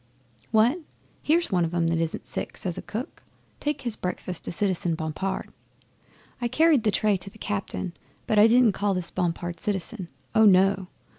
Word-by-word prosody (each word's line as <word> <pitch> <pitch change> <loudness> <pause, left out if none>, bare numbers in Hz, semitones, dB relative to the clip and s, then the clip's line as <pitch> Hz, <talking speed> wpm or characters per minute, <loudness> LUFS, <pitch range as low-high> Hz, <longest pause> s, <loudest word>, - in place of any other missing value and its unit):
'"What! 230 +9 +3 0.4
Here's 335 0 +2
one 180 -2 +2
of 165 +1 -2
'em 170 -1 +2
that 165 0 +1
isn't 165 -1 -2
sick!" - - -5
says 180 -3 -2
a - - -5
cook. 225 +5 -6 0.4
"Take 295 -1 -2
his 235 -4 -3
breakfast 180 -2 -4
to - - -2
Citizen 180 -3 +2
Bompard." 160 +5 -4 0.9
'I 240 - +1
carried 310 -1 +4
the - - +4
tray 210 -1 +2
to 185 +2 -8
the 205 - -17
cabin, 195 -4 -4 0.3
but 215 - +2
I 215 - +8
didn't 240 -1 +5
call 200 0 0
this 180 -2 -2
Bompard 175 -1 -2
"Citizen." 195 0 -3 0.3
Oh 220 - +5
no! 190 -1 +4
195 Hz, 175 wpm, -26 LUFS, 175-220 Hz, 0.9 s, I